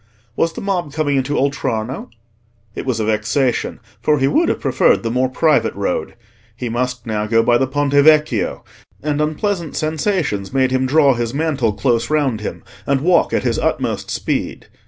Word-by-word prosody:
Was 165 0 0
the - - -7
mob 180 -6 -2
coming 145 -2 0
into 135 +2 -1
Oltrarno? 130 -3 -2 0.6
It - - -6
was 120 -3 0
a 110 - 0
vexation, 115 +4 0 0.2
for 150 -1 +2
he 135 -1 +2
would 325 - +2
have - - -1
preferred 130 -3 +2
the 115 - -1
more 125 +1 +1
private 155 +3 +2
road. 95 -5 -2 0.4
He 120 0 -4
must 125 +1 -2
now 105 -2 -2
go 115 +1 +3
by 120 0 +3
the 135 - +1
Ponte 145 +1 -1
Vecchio; 145 -7 +3 0.4
and 150 0 0
unpleasant 165 +2 -2
sensations 155 - -1
made 130 -1 +2
him 130 0 +1
draw 140 0 +4
his 120 +1 -3
mantle 140 -8 0
close 115 +2 0
round 140 -8 0
him, 105 - -6 0.2
and 140 -1 +1
walk 175 +2 +3
at - - 0
his - - 0
utmost - - -1
speed. - - -3
135 Hz, 175 wpm, -18 LUFS, 115-150 Hz, 0.6 s, draw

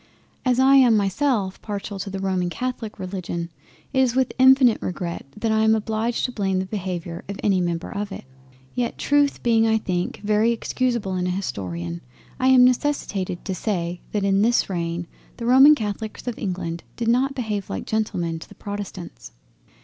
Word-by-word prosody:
As 255 -1 +2
I 270 +1 +6
am 245 -5 +6
myself 200 -1 0
partial 205 -1 -5
to 195 - -4
the 195 - -4
roman 185 -2 0
catholic 245 +1 -4
religion, 180 -3 -4 0.4
it 265 - +2
is 255 -2 +3
with 260 -1 +1
infinite 260 -3 +6
regret 175 -5 -4
that 220 +1 0
I 220 - +2
am 220 0 +4
obliged 220 +2 -1
to 250 - -2
blame 195 -5 -1
the 185 - -1
Behaviour 180 -4 -5
of 200 - -5
any 195 -3 +3
Member 170 -1 -2
of 205 0 -4
it: - - -8 0.5
yet 245 -1 -2
Truth 290 0 +2
being 225 -1 +4
I 220 0 +3
think 180 -4 -2
very 210 +2 +3
excusable 235 -3 -1
in 180 0 -1
an 180 - 0
Historian, 90 - -4 0.4
I 255 - +2
am 255 -1 +7
necessitated 240 - 0
to 190 - -2
say 175 -3 -2
that 205 -2 -1
in 195 0 +3
this 230 -2 +2
reign 170 -1 -2 0.3
the 235 - -5
roman 265 +5 +8
Catholics 215 -2 -5
of 245 -2 -4
England 175 -3 -3
did 235 - -3
not 260 +4 +2
behave 210 -6 -3
like 95 - -4
Gentlemen 175 -7 -1
to - - -12
the - - -14
protestants. 200 - -7
205 Hz, 180 wpm, -23 LUFS, 180-240 Hz, 0.5 s, roman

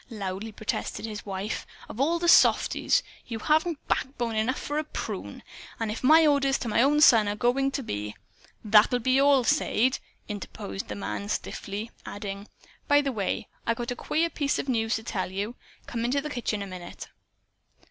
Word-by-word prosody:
loudly 200 -1 -5
protested 215 +1 -4
his 210 -2 -7
wife. 195 +2 -4 0.2
"Of 235 - -5
all 330 +5 +2
the 345 0 -1
softies! - - +4 0.2
You 230 - -4
haven't 310 +6 0
backbone 245 -4 -1
enough 225 +5 0
for 295 +1 -2
a - - -1
prune. 305 - -6 0.4
And 225 -2 -1
if 220 - -6
my 315 +4 +7
orders 275 -2 +3
to 240 - -5
my 225 +1 +2
own 295 +3 +4
son 225 -7 +7
are 205 - -2
going 250 +5 +1
to 275 0 -4
be 105 - -4 0.2
" - - -27
"That'll 215 +4 +7
be 255 +3 +2
all, 280 -2 +5
Sade!" 250 +2 +2 0.3
interposed 205 -1 -6
the - - -5
man 200 0 -4
stiffly 210 +2 -4
adding: 200 0 -6 0.4
"By 290 -1 +5
the 275 -1 -1
way, 205 -6 -2 0.2
I 230 - +2
got 240 +1 -4
a - - -2
queer 330 +6 0
piece 285 -1 0
of - - -3
news 225 -3 +1
to 220 - -4
tell 190 -5 -3
you. 200 +4 -3 0.3
Come 230 -1 -4
into 250 +4 +1
the 300 +1 -5
kitchen 225 -5 -2
a - - -5
minute." 180 -2 -9
235 Hz, 190 wpm, -27 LUFS, 210-275 Hz, 0.4 s, my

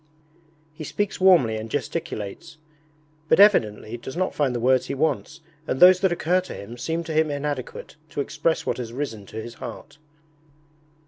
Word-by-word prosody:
He 155 0 -8
speaks 205 +5 -3
warmly 165 -13 +5
and 110 +1 -6
gesticulates, 120 +2 -5 0.7
but - - +4
evidently 115 - +4
does 130 +6 -8
not 185 +1 0
find 135 -4 0
the - - -1
words 130 +1 +2
he - - -3
wants 155 +2 -1 0.3
and 130 - -1
those 180 0 +8
that 190 -2 +2
occur 175 +2 +1
to 185 - -9
him 100 +4 -9
seem 165 +7 -3
to 160 -1 -5
him 155 0 +2
inadequate 145 -1 -5
to - - -6
express 155 +3 -1
what - - -1
has 120 -2 -5
risen 115 -7 -5
to 110 - -7
his 115 +1 -7
heart. 145 - -9
145 Hz, 175 wpm, -24 LUFS, 120-170 Hz, 0.7 s, those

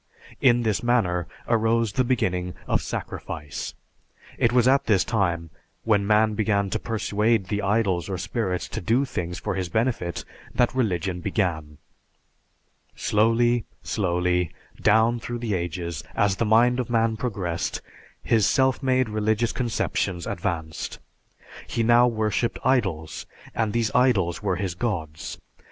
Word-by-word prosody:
In 120 -2 +4
this 110 -3 0
manner 95 -8 +1 0.2
arose 115 -1 +2
the 130 - +2
beginning 90 -8 0
of - - +1
"sacrifice." 75 -2 -5 0.6
It 120 - +3
was 125 0 +4
at 135 +1 +4
this 100 -4 +3
time, 85 -7 -1 0.3
when 105 -3 +2
man 110 0 +4
began 100 -2 0
to 110 - 0
persuade 110 -2 0
the 105 -1 -1
idols 100 -3 +1
or 95 - -2
spirits 95 0 -2
to - - -4
do 120 +9 +2
things 90 -8 -4
for - - -3
his 90 -2 -3
benefit 110 -4 -1 0.3
that 120 - +2
religion 95 -7 0
began. 80 -7 -2 1.2
Slowly, 115 +2 +2 0.2
slowly, 90 -3 0 0.3
down 110 +3 +4
through 120 +1 -5
the 115 -3 -2
ages, 85 -2 -3
as 100 -2 +2
the 115 - +1
mind 120 +3 +4
of 125 - -2
man 115 -1 +2
progressed, 100 -8 -2 0.4
his 110 -4 +3
self 130 -1 +2
made 130 -2 +2
religious 110 +2 0
conceptions 100 -7 -1
advanced. 80 -2 -3 0.7
He 115 - -1
now 120 +2 +6
worshiped 110 0 0
idols, 95 - 0 0.3
and 110 -2 0
these 115 -1 0
idols 100 -10 +2
were 100 -3 0
his 90 -1 -2
gods. 85 -7 -4
105 Hz, 140 wpm, -25 LUFS, 90-115 Hz, 1.2 s, now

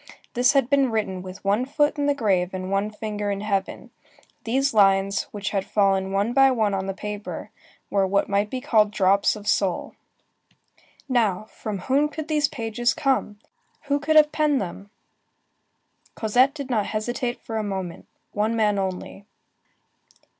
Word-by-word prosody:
This 250 +3 +3
had 275 -4 +3
been 275 -1 +3
written 210 -5 -2
with 185 +1 -10
one 205 +5 +2
foot 295 +2 +1
in 285 - +1
the 285 - +2
grave 190 -7 0
and 185 0 -5
one 200 +2 0
finger 210 -1 -4
in 200 0 -2
heaven. 200 -2 -3 0.5
These 270 +4 +1
lines, 195 -1 +3
which 205 -2 -4
had 195 -2 0
fallen 195 -2 +1
one 200 +4 0
by 270 +1 +6
one 220 -5 +1
on 190 0 -2
the 195 - -3
paper, 210 +1 -6 0.4
were 195 -1 +2
what 200 +1 +1
might 200 +1 0
be 255 +2 -4
called 220 -6 +3
drops 200 0 +2
of 210 -1 -10
soul. 190 -4 0 1.1
Now, 220 -8 +1
from 210 -2 -5
whom 280 +7 +2
could 315 0 -7
these 300 -2 +2
pages 235 -1 -1
come? 265 -7 0 0.5
Who 285 -1 0
could 310 +2 0
have 300 -1 +6
penned 300 -3 +2
them? 195 +2 -6 1.3
Cosette 250 +6 +2
did 280 -3 -6
not 215 -4 +1
hesitate 240 +3 -3
a 225 -1 -2
moment. 190 -4 -5 0.2
One 215 +2 0
man 210 -3 +2
only. 190 +1 -5
215 Hz, 160 wpm, -24 LUFS, 195-260 Hz, 1.3 s, by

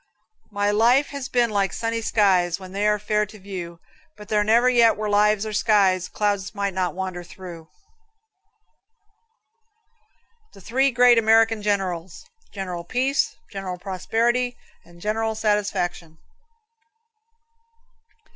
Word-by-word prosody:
My 205 -1 0
life 240 +7 +3
has 280 -2 -6
been 240 -3 +1
like 200 -2 0
sunny 230 0 -3
skies 190 -5 +2
When 185 -1 -11
they 200 +2 0
are 210 0 +2
fair 210 +1 0
to 215 - -13
view; 180 -4 -8 0.4
But 210 - -12
there 210 -1 +2
never 230 +4 +3
yet 235 -3 +4
were 215 0 -3
lives 210 0 +3
or 215 - -5
skies 195 -4 +2
Clouds 205 -1 -2
might 200 -1 -2
not 180 -1 -2
wander 185 -2 -5
through. 170 -2 -11 2.8
The 195 - -15
Three 265 +7 +1
Great 245 -1 +5
American 225 0 +3
Generals. 190 -4 -3 0.3
General 180 -4 -5
Peace, 255 +9 0 0.2
General 195 -2 -5
Prosperity 230 +7 -1 0.3
and 170 0 -18
General 220 +3 -2
Satisfaction. 205 -6 -2
210 Hz, 125 wpm, -23 LUFS, 185-225 Hz, 2.8 s, Great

